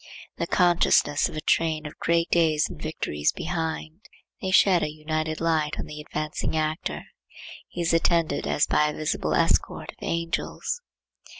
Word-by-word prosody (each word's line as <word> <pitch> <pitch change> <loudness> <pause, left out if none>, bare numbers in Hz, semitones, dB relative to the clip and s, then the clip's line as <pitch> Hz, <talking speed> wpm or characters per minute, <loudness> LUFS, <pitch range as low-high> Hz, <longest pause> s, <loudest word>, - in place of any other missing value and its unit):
The - - -2
consciousness 175 -4 +3
of - - -9
a 155 - -3
train 160 -1 +1
of 150 - -9
great 170 0 +1
days 160 -3 +3
and - - -10
victories 75 0 -1
behind. 160 -1 -4 0.4
They 190 - -2
shed 185 -2 +5
an - - 0
united 155 +1 -3
light 160 -2 0
on - - -3
the 150 0 -8
advancing 155 +1 -3
actor. 155 +1 -2 0.6
He 175 - -5
is 170 0 +1
attended 165 -3 +2
as 150 - +2
by 150 - +3
a 150 - -3
visible 155 - -1
escort - - +1
of - - -27
angels. 170 - -2
160 Hz, 160 wpm, -25 LUFS, 155-170 Hz, 0.6 s, shed